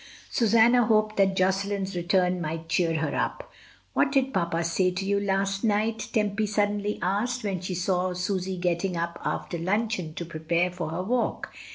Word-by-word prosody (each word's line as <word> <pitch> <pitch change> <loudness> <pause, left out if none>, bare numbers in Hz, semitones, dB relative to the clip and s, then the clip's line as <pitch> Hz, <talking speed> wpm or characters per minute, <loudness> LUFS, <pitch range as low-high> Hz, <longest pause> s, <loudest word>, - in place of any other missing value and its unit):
Susanna 235 +2 +5
hoped 215 -1 +2
that 195 -1 +3
Josselin's 195 +1 0
return 180 +1 +1
might 165 0 -4
cheer 165 -1 +1
her 160 - -1
up. - - -3 0.4
"What 275 - +2
did 270 -1 +1
papa 170 -3 0
say 180 +2 +2
to 185 +2 -3
you 200 +1 +2
last 195 0 0
night?" 220 +1 0
Tempy 210 0 0
suddenly 205 0 0
asked, 215 +7 0
when 195 -4 -2
she 185 0 -3
saw 180 0 0
Susy 185 0 -2
getting 175 +1 -1
up 170 0 -3
after 170 - -3
luncheon 190 -2 -1
to 170 - -4
prepare 170 +2 0
for 175 -3 -4
her 165 +3 -3
walk. 240 +5 -1
190 Hz, 170 wpm, -26 LUFS, 175-210 Hz, 0.4 s, Susanna